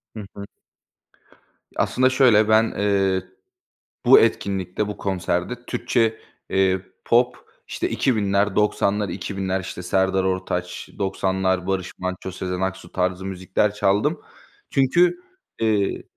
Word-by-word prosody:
Hı 105 -2 -6
hı. 100 - -7 1.3
Aslında, 130 0 +2
şöyle, 120 -5 +4
ben, 110 +1 +4
eee, 95 -2 +1 0.8
bu - - +8
etkinlikte 100 - 0
bu 105 - -6
konserde 95 +5 -2
Türkçe, 115 -2 0 0.3
eee, 95 -1 +2 0.2
pop, 125 +1 +3 0.3
işte, - - -3
2000'ler 100 -4 +1
90'lar 105 -1 +1
2000'ler, 95 -1 -3
işte, 90 -1 -7
Serdar 95 +1 +1
Ortaç 95 -1 -3
90'lar 95 -1 0
Barış 95 -2 -2
Manço, 95 0 -4
Sezen 90 0 -4
Aksu 95 -2 -4
tarzı 95 0 -1
müzikler 95 +2 -1
çaldım. 105 -1 +1 0.5
Çünkü, 170 - +3 0.4
eee 105 -3 0
95 Hz, 110 wpm, -22 LUFS, 95-110 Hz, 1.3 s, bu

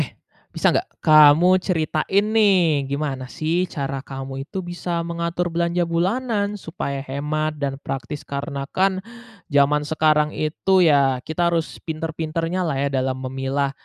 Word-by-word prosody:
Eh, - - -3 0.4
bisa - - +2
nggak 370 - -1 0.2
kamu 155 +4 +7
ceritain 180 +3 0
nih, 175 -10 +3
gimana 140 -2 -3
sih 170 +4 0
cara 135 -2 -4
kamu 135 0 -6
itu 190 - -4
bisa 175 -1 -3
mengatur 170 +1 -2
belanja 170 +1 +1
bulanan 205 +5 -1
supaya 150 -6 -5
hemat 150 +3 -2
dan 135 -1 -2
praktis? 135 +2 -6
Karena 140 0 -4
kan 190 +4 +1 0.6
zaman 145 +1 +3
sekarang 155 0 +2
itu 185 +5 +1
ya, 140 -5 +3
kita 170 +2 0
harus 165 -1 -2
pintar-pintarnya 165 +2 -2
lah 150 -5 -1
ya 140 - +1
dalam 130 -1 -1
memilah 135 +1 -2
155 Hz, 140 wpm, -22 LUFS, 140-175 Hz, 0.6 s, kamu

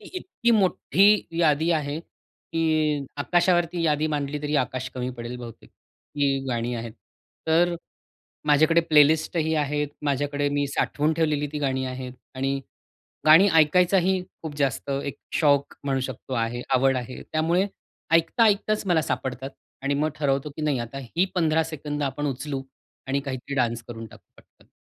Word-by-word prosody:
ती 405 - -13
इतकी 255 -10 -1
मोठ्ठी 205 0 +4
यादी 160 0 +3
आहे 150 -2 0 0.5
की 155 -3 +1
आकाशावरती 175 +2 +2
यादी 155 -1 +2
मांडली 150 -1 -2
तरी 150 +1 -2
आकाश 130 -1 -1
कमी 125 0 -3
पडेल 120 +1 -6
बहुतेक, 120 -2 -11 0.4
इतकी 140 -2 +1
गाणी 120 0 -1
आहेत. 115 -1 -5 0.5
तर 170 +2 +3 0.7
माझ्याकडे 155 +3 +5
प्लेलिस्ट 160 0 +4
ही 160 -1 +1
आहेत, 150 -1 0
माझ्याकडे 145 0 0
मी 145 0 0
साठवून 150 +2 0
ठेवलेली 150 -3 +1
ती 150 - -3
गाणी 130 -2 -1
आहेत, 130 0 -6 0.2
आणि 135 +1 -1 0.7
गाणी 160 +6 +8
ऐकायचाही 180 +4 +4 0.2
खूप 155 -2 -6
जास्त 140 0 -1
एक 140 0 -5 0.2
शौक 140 -3 +2
म्हणू 135 -1 0
शकतो, 130 0 -6
आहे 120 0 -1
आवड 135 +1 +3
आहे. 125 0 -6
त्यामुळे 170 +5 +2 0.5
ऐकता 165 +8 +4
ऐकताच 210 0 +1
मला 165 -3 +3
सापडतात 130 -1 -3 0.3
आणि 140 +1 +1
मग 150 +2 +1
ठरवतो 140 -1 0
की - - -6
नाही 150 -4 0
आता 120 +3 -6
ही 165 +9 0
15 160 -2 +2
सेकंद 150 -2 -4
आपण 145 +2 -2
उचलू 135 +1 -3 0.5
आणि 135 +1 0
काहीतरी 135 0 -5
डान्स 120 -2 0
करून 115 -1 -7
टाकू - - -15
पटकन. - - -23
145 Hz, 150 wpm, -25 LUFS, 135-160 Hz, 0.7 s, गाणी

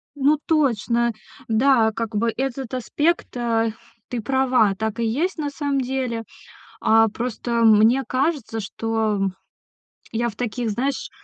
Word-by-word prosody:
Ну 290 +2 +3
точно. 235 -6 +2 0.4
Да, 230 0 +4
как 225 0 -4
бы 230 +2 +1
этот 265 -1 -3
аспект, 295 +7 0
а. 230 -1 +1 0.4
Ты 245 - -3
права, 255 -5 +2
так 220 +3 -3
и 230 - +1
есть 310 +12 -1
на 295 -2 -2
самом 285 -1 -1
деле. 250 -3 -2 0.6
А, 225 0 +5
просто 235 +1 -2
мне 225 +4 +5
кажется, 260 -3 -1
что, 220 +1 -1
м, 195 -1 0 0.8
я 235 +1 0
в 215 - -11
таких, 240 -1 -2
знаешь, 265 +6 -2
235 Hz, 140 wpm, -22 LUFS, 225-270 Hz, 0.8 s, А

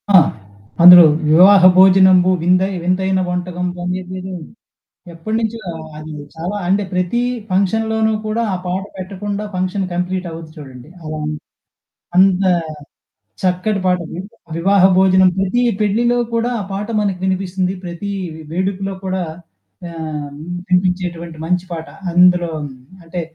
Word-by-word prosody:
ఆ! - - +11 0.7
అందులో 180 0 +11 0.3
'వివాహ 185 +5 +7 0.2
భోజనంబు 185 -1 +6
విందయి 185 +3 +2
వింతైన 190 +1 0
వంటకంబు' 180 0 -4
అనేదేదో 185 +1 -5 0.8
ఎప్పటినుంచో 220 +6 -3 0.4
అది 155 0 -9 0.2
చాలా 175 +6 -4
అంటే 200 +2 +2
ప్రతీ 180 +6 0 0.3
ఫంక్షన్‌లోనూ 220 +3 +1
కూడా 225 +2 -1
ఆ - - 0
పాట 185 +2 -2 0.2
పెట్టకుండా 200 +2 -5
ఫంక్షన్ 185 +2 -2
కంప్లీట్ 180 +1 -2
అవ్వదు 165 -1 -9
చూడండి. 135 -2 -11
అలా. 155 0 -6 1.0
అంత, 190 0 +4 1.0
చక్కటి 185 +3 0
పాటండి, 180 -2 -2 0.4
'వివాహ 195 +2 +3
భోజనంబు' 185 -1 +4
ప్రతి 195 +6 0 0.2
పెళ్ళిలో 235 +4 +1 0.2
కూడా 230 +2 0
ఆ - - -4
పాట 200 +2 -4
మనకు 195 -3 -2
వినిపిస్తుంది. 185 0 -1
ప్రతీ 175 +3 -6 0.2
వే 160 - -10
వేడుకలో 195 +2 -2
కూడా 185 0 -2 0.7
ఆహ్, 155 -3 -6 0.4
వినిపించేటువంటి 180 -2 -1
మంచి 180 +1 0
పాట. 165 -1 -6 0.2
అందులో 180 -1 +4 0.5
అంటే 170 +1 -5
185 Hz, 115 wpm, -17 LUFS, 175-195 Hz, 1.0 s, ఆ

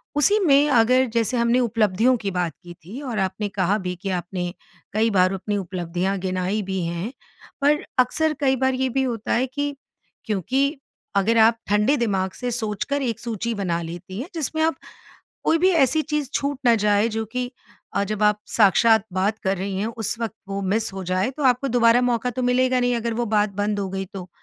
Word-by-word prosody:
उसी 405 +9 +4
में 285 0 +5
अगर 255 +1 +4
जैसे 235 +2 +1
हमने 235 +2 +3
उपलब्धियों 230 +1 +2
की 200 -3 -3
बात 175 -4 -1
की 175 0 -10
थी 235 +10 -8
और 240 -7 -3
आपने 190 +2 -1
कहा 195 +1 +1
भी 180 -2 -4
कि 195 - -3
आपने 180 0 -3 0.4
कई 220 +2 +2
बार 185 -2 +3
अपनी 205 +2 -2
उपलब्धियाँ 180 +1 -2
गिनाई 185 +3 -1
भी 190 -1 -3
हैं। 170 +7 -3 0.5
पर 295 +1 +2
अक्सर 310 +5 +2
कई 265 -2 +2
बार 260 0 +1
ये 260 0 0
भी 265 +2 0
होता 230 -4 -2
है 245 +2 +2
कि 285 +2 -3 0.5
क्योंकि 260 - 0 0.4
अगर 220 +4 +3
आप 225 +1 +5
ठंडे 210 +8 +3
दिमाग़ 195 -6 0
से 250 -1 -3
सोच 220 -4 -2
कर 285 0 -1
एक 235 -5 -2
सूची 230 -1 -3
बना 175 -4 -1
लेती 175 +4 -7
हैं 300 - -6
जिसमें 315 0 -2
आप 325 +1 +2 0.7
कोई 330 - +3
भी 370 +3 +4
ऐसी 305 -2 +3
चीज़ 300 -3 -2
छूट 280 -1 -1
ना 235 -1 +6
जाए 210 0 +2
जो 225 0 -1
कि 250 0 -3 0.4
अ, 200 - +1
जब 210 +1 -2
आप 210 0 +3 0.2
साक्षात 220 +1 +5
बात 200 +4 0
कर 190 -1 0
रही 190 +1 -3
हैं 210 - -1
उस 225 -1 -3
वक़्त 225 -2 -3
वो 195 0 -3
मिस 220 0 -1
हो 190 -1 -5
जाए 185 +4 0
तो 295 +2 -6
आपको 255 +1 +3
दोबारा 235 -1 +4
मौका 245 0 +1
तो 250 +1 -3
मिलेगा 255 +1 +2
नहीं 245 -1 +1
अगर 230 0 -2
वो 240 +1 -1
बात 210 -1 +2
बंद 205 +1 -1
हो 195 -1 -2
गई 195 0 -3
तो, 185 -2 -7
225 Hz, 205 wpm, -23 LUFS, 195-255 Hz, 0.7 s, ना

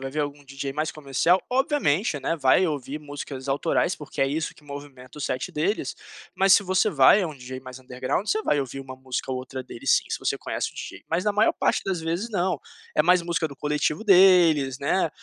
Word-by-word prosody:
vai 135 0 -5
ver 150 - -5
algum 145 0 -4
DJ 135 0 -5
mais 155 +2 -2
comercial, 155 +5 +1
obviamente, 250 - +1
né, 145 - -1
vai 140 +6 +4
ouvir 145 -2 -4
músicas 145 -2 -8
autorais, 160 +5 +1
porque 145 -2 -8
é 135 - +4
isso 155 +3 -2
que 150 - -21
movimenta 140 -3 -10
o 150 - -8
set 130 -2 -3
deles, 180 +8 -1 0.4
mas 195 0 +4
se 200 - +3
você 185 0 +2
vai 145 +8 +6
a - - 0
um 150 - -9
DJ 130 0 -8
mais 130 0 -10
underground, 130 +8 -3
você 215 +1 0
vai 150 - +1
ouvir 135 0 -4
uma 130 -1 -9
música 130 0 -4
ou 130 - -2
outra 130 0 -6
dele 120 - -11
sim, - - +4
se - - -2
você - - -1
conhece - - -3
o - - -25
DJ. - - -8
Mas 165 +2 0
na 210 - +1
maior 210 +2 +3
parte - - 0
das 190 -3 -2
vezes, 170 +7 -2
não, 180 -4 0 0.4
é 150 - +5
mais 180 +1 +4
música 170 -1 -1
do 140 - -10
coletivo 150 +5 -1
deles, 175 - +5
né, 165 +5 +1
150 Hz, 225 wpm, -25 LUFS, 135-180 Hz, 0.4 s, vai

